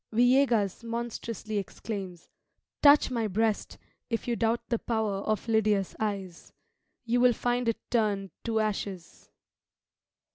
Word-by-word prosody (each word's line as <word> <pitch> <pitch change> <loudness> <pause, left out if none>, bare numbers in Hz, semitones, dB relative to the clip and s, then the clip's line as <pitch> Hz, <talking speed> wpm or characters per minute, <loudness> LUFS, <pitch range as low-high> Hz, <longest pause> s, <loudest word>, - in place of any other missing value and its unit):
Villegas 240 -4 +3
monstrously 230 -2 -4
exclaims, 195 -3 -6 0.5
"Touch 290 -2 +6
my 230 -3 0
breast, 215 +2 -1 0.3
if 230 0 -2
you 240 - +1
doubt 230 0 0
the 235 -3 0
power 220 -4 -1
of 215 +2 -2
Lydia's 215 -3 +1
eyes 195 -5 -4 0.5
you 240 +1 +2
will 250 -1 +6
find 245 +1 -1
it 230 - 0
turned 205 -5 +1
to 225 -1 0
ashes." 200 -4 -4
220 Hz, 120 wpm, -28 LUFS, 200-235 Hz, 0.5 s, Touch